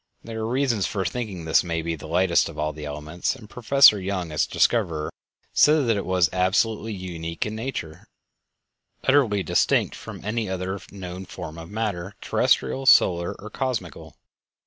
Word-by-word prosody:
There 115 Hz, -1 st, -6 dB
are 110 Hz, -, -2 dB
reasons 125 Hz, -5 st, +1 dB
for 95 Hz, -3 st, -2 dB
thinking 105 Hz, -9 st, -4 dB
that 80 Hz, -, -5 dB
this -, -, +5 dB
may 85 Hz, -2 st, -2 dB
be 85 Hz, 0 st, -2 dB
the 80 Hz, 0 st, -10 dB
lightest 85 Hz, +1 st, +2 dB
of 80 Hz, -, -11 dB
all 75 Hz, 0 st, -1 dB
the 75 Hz, 0 st, -8 dB
elements, 75 Hz, -, -3 dB
and 115 Hz, -5 st, -13 dB
Professor 120 Hz, -2 st, +5 dB
Young, 95 Hz, -3 st, -3 dB
its 75 Hz, -, +1 dB
discoverer, 85 Hz, -10 st, +1 dB, 0.4 s
said 150 Hz, -2 st, +5 dB
that 115 Hz, -, +3 dB
it 100 Hz, -, -3 dB
was 90 Hz, -1 st, +3 dB
"absolutely 100 Hz, +4 st, +1 dB
unique 85 Hz, -3 st, -5 dB
in 105 Hz, -, -4 dB
nature; 110 Hz, -10 st, -6 dB, 1.0 s
utterly 125 Hz, -8 st, +3 dB
distinct 90 Hz, -, +2 dB
from -, -, -9 dB
any 110 Hz, -1 st, -2 dB
other 95 Hz, +1 st, -3 dB
known 95 Hz, -1 st, -7 dB
form 80 Hz, -1 st, -8 dB
of 80 Hz, 0 st, -10 dB
matter, 105 Hz, -4 st, -3 dB
terrestial, 135 Hz, 0 st, +1 dB
solar, 85 Hz, -7 st, +5 dB
or 105 Hz, +1 st, -9 dB
cosmical." 115 Hz, -, -4 dB
95 Hz, 170 wpm, -24 LUFS, 85-110 Hz, 1.0 s, this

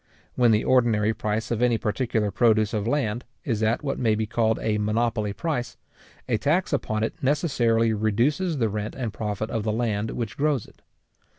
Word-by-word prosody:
When 120 Hz, -1 st, +3 dB
the 110 Hz, -1 st, +3 dB
ordinary 115 Hz, -4 st, +3 dB
price 110 Hz, 0 st, -2 dB
of 120 Hz, 0 st, -1 dB
any 120 Hz, -2 st, +3 dB
particular 110 Hz, -1 st, -1 dB
produce 110 Hz, 0 st, +3 dB
of 105 Hz, 0 st, -1 dB
land 120 Hz, -3 st, 0 dB, 0.2 s
is 115 Hz, -6 st, -1 dB
at 110 Hz, +5 st, +1 dB
what 135 Hz, -, -2 dB
may 110 Hz, -3 st, +2 dB
be 110 Hz, +1 st, -1 dB
called 110 Hz, 0 st, +1 dB
a 105 Hz, -1 st, 0 dB
monopoly 110 Hz, 0 st, 0 dB
price, 125 Hz, +2 st, -3 dB, 0.5 s
a 115 Hz, -4 st, +1 dB
tax 155 Hz, -, +1 dB
upon 110 Hz, -6 st, -1 dB
it 110 Hz, -, -4 dB
necessarily 120 Hz, -6 st, +2 dB
reduces 125 Hz, -, +1 dB
the 115 Hz, -4 st, +2 dB
rent 105 Hz, 0 st, -4 dB
and 120 Hz, -5 st, -4 dB
profit 105 Hz, 0 st, -3 dB
of 115 Hz, -, -1 dB
the 110 Hz, +1 st, -1 dB
land 110 Hz, -1 st, -1 dB
which 115 Hz, -4 st, -4 dB
grows 145 Hz, -4 st, +1 dB
it. -, -, -20 dB
115 Hz, 185 wpm, -25 LUFS, 110-125 Hz, 0.5 s, When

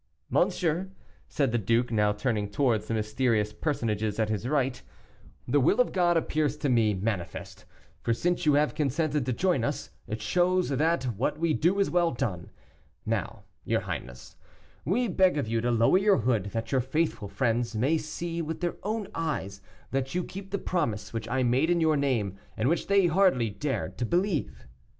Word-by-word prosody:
"Monsieur," 175 Hz, +2 st, +1 dB, 0.4 s
said 140 Hz, -6 st, 0 dB
the 120 Hz, -, +1 dB
duke, 115 Hz, +4 st, +1 dB
now 105 Hz, -2 st, +3 dB
turning 105 Hz, -1 st, -1 dB
towards 110 Hz, -1 st, +1 dB
the -, -, -2 dB
mysterious 110 Hz, -1 st, 0 dB
personages 110 Hz, -6 st, -1 dB
at 110 Hz, -1 st, +1 dB
his 110 Hz, +2 st, -2 dB
right, 135 Hz, -2 st, 0 dB, 0.7 s
"the 145 Hz, +4 st, +3 dB
will 135 Hz, -, +3 dB
of 250 Hz, -, +3 dB
God 175 Hz, -2 st, +3 dB
appears 150 Hz, -2 st, 0 dB
to 145 Hz, -, -1 dB
me 110 Hz, -4 st, +3 dB
manifest; 95 Hz, -2 st, -4 dB, 0.4 s
for -, -, -1 dB
since 175 Hz, +10 st, 0 dB
you 150 Hz, -3 st, +4 dB
have 150 Hz, +1 st, +2 dB
consented 150 Hz, -1 st, 0 dB
to -, -, +1 dB
join 145 Hz, 0 st, +1 dB
us, -, -, -3 dB, 0.2 s
it 110 Hz, -, -4 dB
shows 180 Hz, +6 st, +1 dB
that 150 Hz, +2 st, +1 dB
what 125 Hz, +3 st, -1 dB
we 165 Hz, 0 st, +1 dB
do 175 Hz, +6 st, +2 dB
is 200 Hz, -, +2 dB
well 175 Hz, -1 st, +3 dB
done. 120 Hz, -, -3 dB, 0.6 s
Now, -, -, -2 dB, 0.2 s
your -, -, 0 dB
highness, 60 Hz, -1 st, -7 dB, 0.5 s
we 230 Hz, -, +1 dB
beg 185 Hz, -4 st, +3 dB
of 140 Hz, -6 st, -1 dB
you 115 Hz, 0 st, 0 dB
to 120 Hz, -, 0 dB
lower 115 Hz, +10 st, +4 dB
your 200 Hz, 0 st, +4 dB
hood, 115 Hz, -4 st, +1 dB
that 115 Hz, +3 st, -4 dB
your 130 Hz, -2 st, +3 dB
faithful 135 Hz, -4 st, -1 dB
friends 115 Hz, 0 st, -1 dB
may 140 Hz, +9 st, +2 dB
see 165 Hz, +2 st, -4 dB
with 160 Hz, 0 st, -4 dB
their 175 Hz, -1 st, -2 dB
own 215 Hz, -1 st, -2 dB
eyes 100 Hz, -12 st, -3 dB, 0.3 s
that 135 Hz, +3 st, -2 dB
you 180 Hz, -, +1 dB
keep 195 Hz, +2 st, -8 dB
the 200 Hz, -, -1 dB
promise 150 Hz, -, -2 dB
which 115 Hz, -1 st, -4 dB
I 130 Hz, -1 st, +1 dB
made 130 Hz, +6 st, +2 dB
in 175 Hz, -1 st, +3 dB
your 160 Hz, -1 st, +3 dB
name, 115 Hz, -9 st, 0 dB, 0.2 s
and 115 Hz, +5 st, +1 dB
which 170 Hz, -, 0 dB
they 200 Hz, -1 st, +4 dB
hardly 170 Hz, -, +3 dB
dared 135 Hz, +6 st, -3 dB
to 120 Hz, -, 0 dB
believe." 175 Hz, -, -1 dB
135 Hz, 185 wpm, -28 LUFS, 115-170 Hz, 0.7 s, you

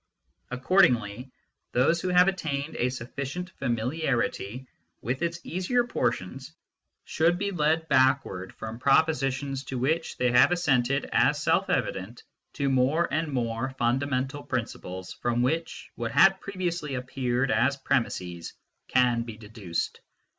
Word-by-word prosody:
Accordingly 125 Hz, -, +2 dB, 0.4 s
those 150 Hz, +7 st, +3 dB
who -, -, -2 dB
have 180 Hz, 0 st, +5 dB
attained 160 Hz, -6 st, -2 dB
a 125 Hz, -, +1 dB
sufficient 140 Hz, +8 st, -5 dB
familiarity 125 Hz, -2 st, -1 dB, 0.4 s
with 125 Hz, +5 st, -2 dB
its 170 Hz, 0 st, -1 dB
easier 185 Hz, +8 st, 0 dB
portions 130 Hz, -, -3 dB, 0.5 s
should 170 Hz, +2 st, +2 dB
be 200 Hz, +2 st, -2 dB
led 160 Hz, -1 st, +1 dB
backward 130 Hz, -, +2 dB
from 110 Hz, +1 st, -7 dB
propositions 135 Hz, -1 st, +1 dB
to 130 Hz, -, -4 dB
which 160 Hz, +7 st, -1 dB
they 125 Hz, -1 st, +2 dB
have 125 Hz, +7 st, +6 dB
assented 140 Hz, -6 st, +1 dB
as -, -, +3 dB
self -, -, +2 dB
evident 95 Hz, +6 st, -2 dB, 0.3 s
to 140 Hz, -, -1 dB
more 135 Hz, +5 st, +2 dB
and 160 Hz, -1 st, 0 dB
more 125 Hz, +1 st, -2 dB
fundamental 135 Hz, +3 st, 0 dB
principles 95 Hz, -8 st, -5 dB
from 120 Hz, 0 st, -1 dB
which 160 Hz, +6 st, -2 dB
what 115 Hz, -1 st, -4 dB
had 195 Hz, +8 st, +5 dB
previously 175 Hz, -7 st, -3 dB
appeared 125 Hz, 0 st, -1 dB
as 125 Hz, +6 st, +2 dB
premises 90 Hz, -11 st, -2 dB, 0.3 s
can 125 Hz, -2 st, +3 dB
be 115 Hz, -2 st, -7 dB
deduced. 105 Hz, -6 st, -4 dB
130 Hz, 125 wpm, -27 LUFS, 120-160 Hz, 0.5 s, have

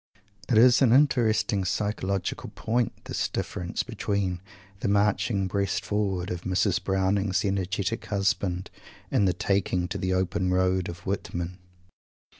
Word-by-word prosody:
It 115 Hz, -, +4 dB
is 125 Hz, +3 st, +6 dB
an 120 Hz, -4 st, +5 dB
interesting 120 Hz, -7 st, +3 dB
psychological 100 Hz, -1 st, -2 dB
point, 120 Hz, 0 st, -1 dB
this -, -, -1 dB
difference 85 Hz, 0 st, -3 dB
between 95 Hz, -4 st, -2 dB, 0.4 s
the -, -, -2 dB
"marching 100 Hz, 0 st, +2 dB
breast 100 Hz, +1 st, -1 dB
forward" 95 Hz, -4 st, -1 dB
of 90 Hz, -1 st, -4 dB
Mrs. 95 Hz, 0 st, +1 dB
Browning's 95 Hz, +1 st, +1 dB
energetic 95 Hz, +2 st, -1 dB
husband, 95 Hz, -2 st, -1 dB, 0.4 s
and 100 Hz, -, +3 dB
the 90 Hz, -, +2 dB
"taking 90 Hz, -1 st, 0 dB
to -, -, -3 dB
the 95 Hz, 0 st, 0 dB
open 95 Hz, 0 st, 0 dB
road" 95 Hz, 0 st, +1 dB
of 85 Hz, 0 st, -9 dB
Whitman. 90 Hz, -2 st, -3 dB
95 Hz, 130 wpm, -27 LUFS, 90-105 Hz, 0.4 s, is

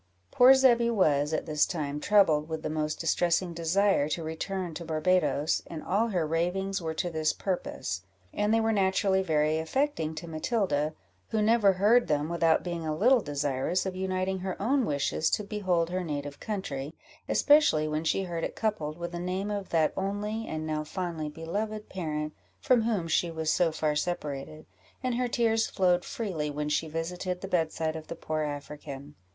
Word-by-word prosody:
Poor 255 Hz, +2 st, +8 dB
Zebby 240 Hz, -3 st, +4 dB
was, 150 Hz, -9 st, +2 dB
at 155 Hz, -, -1 dB
this 150 Hz, -2 st, +2 dB
time, 150 Hz, -4 st, -3 dB
troubled 160 Hz, -5 st, +3 dB
with 160 Hz, 0 st, -4 dB
the -, -, -2 dB
most 155 Hz, 0 st, -2 dB
distressing 170 Hz, +1 st, +1 dB
desire 170 Hz, -1 st, +2 dB
to 165 Hz, +2 st, -2 dB
return 175 Hz, +2 st, -4 dB
to 170 Hz, -, -6 dB
Barbadoes, 160 Hz, -1 st, +1 dB
and 160 Hz, -2 st, -7 dB
all 210 Hz, +5 st, +1 dB
her 180 Hz, -7 st, 0 dB
ravings 180 Hz, +5 st, -1 dB
were 160 Hz, -1 st, -3 dB
to 175 Hz, +2 st, -2 dB
this 155 Hz, -1 st, +1 dB
purpose; 175 Hz, -, -3 dB, 0.3 s
and 210 Hz, +1 st, +1 dB
they 225 Hz, -, +4 dB
were 225 Hz, 0 st, +2 dB
naturally 190 Hz, -1 st, +2 dB
very 155 Hz, -3 st, +1 dB
affecting 160 Hz, -, -1 dB
to 170 Hz, -, -7 dB
Matilda, 155 Hz, -, -1 dB, 0.3 s
who 220 Hz, -, 0 dB
never 210 Hz, -2 st, +4 dB
heard 210 Hz, +6 st, +4 dB
them 150 Hz, +1 st, 0 dB
without 165 Hz, -1 st, +2 dB
being 170 Hz, -2 st, -4 dB
a 155 Hz, -1 st, -2 dB
little 245 Hz, +8 st, +4 dB
desirous 145 Hz, +3 st, -1 dB
of 190 Hz, -1 st, -3 dB
uniting 190 Hz, 0 st, -1 dB
her 185 Hz, 0 st, -4 dB
own 255 Hz, +4 st, +1 dB
wishes 145 Hz, +2 st, 0 dB
to 210 Hz, -, 0 dB
behold 185 Hz, -5 st, 0 dB
her 185 Hz, 0 st, -1 dB
native 145 Hz, -3 st, -5 dB
country, 160 Hz, -9 st, -4 dB, 0.3 s
especially 290 Hz, -, +4 dB
when 155 Hz, +1 st, -2 dB
she 195 Hz, +4 st, +1 dB
heard 170 Hz, -3 st, -4 dB
it -, -, -3 dB
coupled 205 Hz, -9 st, -2 dB
with 170 Hz, 0 st, -5 dB
the 175 Hz, -, -5 dB
name 185 Hz, +3 st, -2 dB
of 200 Hz, -2 st, -4 dB
that 160 Hz, -2 st, +2 dB
only, 205 Hz, +3 st, -3 dB
and 155 Hz, 0 st, -4 dB
now 155 Hz, -1 st, -2 dB
fondly 160 Hz, -1 st, -4 dB
beloved 210 Hz, +8 st, -4 dB
parent, 155 Hz, -4 st, -3 dB, 0.3 s
from 250 Hz, -2 st, +3 dB
whom 215 Hz, -7 st, 0 dB
she 170 Hz, +1 st, +1 dB
was 160 Hz, -1 st, -1 dB
so 170 Hz, -2 st, +2 dB
far 155 Hz, -1 st, 0 dB
separated, 150 Hz, -2 st, -3 dB, 0.4 s
and 255 Hz, -1 st, 0 dB
her 250 Hz, +1 st, 0 dB
tears 225 Hz, -2 st, +2 dB
flowed 180 Hz, -2 st, +2 dB
freely 175 Hz, -10 st, -3 dB
when 150 Hz, 0 st, -3 dB
she 160 Hz, +2 st, 0 dB
visited 180 Hz, +3 st, -3 dB
the 195 Hz, -, -5 dB
bedside 160 Hz, -3 st, 0 dB
of 155 Hz, -1 st, -7 dB
the 170 Hz, -, -6 dB
poor 155 Hz, -1 st, -3 dB
African. 145 Hz, -1 st, -6 dB
170 Hz, 180 wpm, -28 LUFS, 155-195 Hz, 0.4 s, Poor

